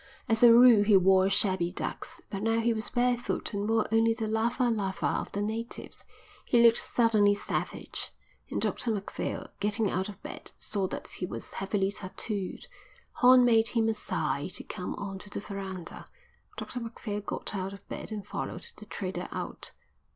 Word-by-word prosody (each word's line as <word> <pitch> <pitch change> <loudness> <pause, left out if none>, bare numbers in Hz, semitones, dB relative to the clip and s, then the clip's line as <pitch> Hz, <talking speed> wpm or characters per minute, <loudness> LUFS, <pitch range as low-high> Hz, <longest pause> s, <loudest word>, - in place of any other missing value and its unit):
As 225 -2 +2
a 240 -1 +9
rule 235 -3 +8
he 205 -1 +6
wore 190 0 +5
shabby 190 -3 +3
ducks, - - -5
but 195 -2 -3
now 225 +1 +2
he 230 +1 +2
was 220 -1 -1
barefoot 245 -2 0
and 205 +1 -2
wore 225 -1 +3
only 225 0 +3
the 225 -1 -2
lava 230 +3 +1
lava 200 -5 -1
of - - -1
the 205 - -2
natives. 225 +3 -5 0.4
He 235 -1 +4
looked 230 0 +6
suddenly 215 -4 +3
savage, - - -3 0.4
and - - -2
Dr 240 - 0
Macphail, 205 -3 -3
getting 210 0 0
out 190 +3 -1
of 200 -1 -10
bed, - - -8
saw 195 -3 -1
that - - -6
he 180 - -5
was - - -7
heavily 195 0 0
tattooed. 200 0 -5 0.5
Horn 250 0 +7
made 225 -2 +5
him 230 -2 +2
a - - +2
sign 150 -7 -2
to 185 - -6
come 180 - -5
on 195 -1 -5
to 205 - -12
the - - -5
verandah. 195 -4 -7 0.5
Dr 250 - -5
Macphail 225 -3 -5
got 205 - -4
out 190 -1 -3
of 200 0 -12
bed - - -6
and 210 -2 -5
followed 470 - -5
the - - -12
trader - - -4
out. - - -3
210 Hz, 180 wpm, -29 LUFS, 195-230 Hz, 0.5 s, a